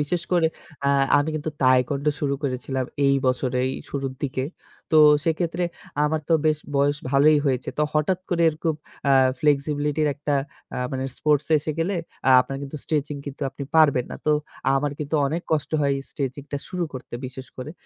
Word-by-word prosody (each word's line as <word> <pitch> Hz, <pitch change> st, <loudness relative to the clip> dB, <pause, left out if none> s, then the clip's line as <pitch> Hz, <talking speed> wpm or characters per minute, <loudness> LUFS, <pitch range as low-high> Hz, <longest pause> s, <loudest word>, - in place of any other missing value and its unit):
বিশেষ 165 Hz, +4 st, -1 dB
করে 175 Hz, -2 st, +4 dB, 0.4 s
আ 140 Hz, -, +4 dB, 0.3 s
আমি 145 Hz, +2 st, 0 dB
কিন্তু 155 Hz, 0 st, -3 dB
তাইকুয়ান্ডো 130 Hz, +3 st, +3 dB
শুরু 140 Hz, -2 st, 0 dB
করেছিলাম 130 Hz, -1 st, -2 dB, 0.2 s
এই 140 Hz, -, +4 dB
বছরেই 130 Hz, 0 st, +1 dB, 0.2 s
শুরুর 135 Hz, -2 st, -3 dB
দিকে। 130 Hz, -1 st, -1 dB, 0.5 s
তো 155 Hz, -, +7 dB, 0.3 s
সেক্ষেত্রে 165 Hz, +1 st, 0 dB, 0.4 s
আমার 155 Hz, +1 st, +1 dB
তো 165 Hz, -, +5 dB
বেশ 155 Hz, -1 st, +3 dB, 0.2 s
বয়স 145 Hz, +1 st, +3 dB
ভালই 145 Hz, +2 st, +5 dB
হয়েছে। 130 Hz, -2 st, 0 dB
তো -, -, +3 dB
হঠাৎ 155 Hz, +4 st, +1 dB
করে 170 Hz, -1 st, +2 dB
আ -, -, +6 dB
এরকম 160 Hz, +1 st, -1 dB, 0.7 s
ফ্লেক্সিবিলিটির 150 Hz, +1 st, +1 dB
একটা 145 Hz, +1 st, -2 dB, 0.6 s
মানে 130 Hz, 0 st, -2 dB
স্পোর্টস 150 Hz, -2 st, +2 dB
এসে 155 Hz, -, -3 dB
গেলে 180 Hz, +4 st, 0 dB, 0.3 s
আ -, -, +6 dB
আপনার 135 Hz, +2 st, -4 dB
কিন্তু 140 Hz, +2 st, -6 dB
স্ট্রেচিং 150 Hz, -1 st, -1 dB
কিন্তু 140 Hz, +1 st, -6 dB
আপনি 140 Hz, -, -7 dB
পারবেন 145 Hz, -6 st, +5 dB
না। -, -, -5 dB
তো 150 Hz, -, +5 dB, 0.4 s
আমার 145 Hz, +1 st, +1 dB
কিন্তু 150 Hz, +1 st, -4 dB
অনেক 165 Hz, +4 st, -2 dB
কষ্ট 155 Hz, -2 st, 0 dB
হয় 140 Hz, -1 st, +2 dB, 0.2 s
স্ট্রেচিং 135 Hz, 0 st, -4 dB
টা 145 Hz, -, -1 dB
শুরু 180 Hz, -2 st, -2 dB
করতে 130 Hz, -2 st, -8 dB
বিশেষ 130 Hz, 0 st, -9 dB
করে। 130 Hz, +3 st, -6 dB
145 Hz, 170 wpm, -24 LUFS, 135-155 Hz, 0.7 s, তো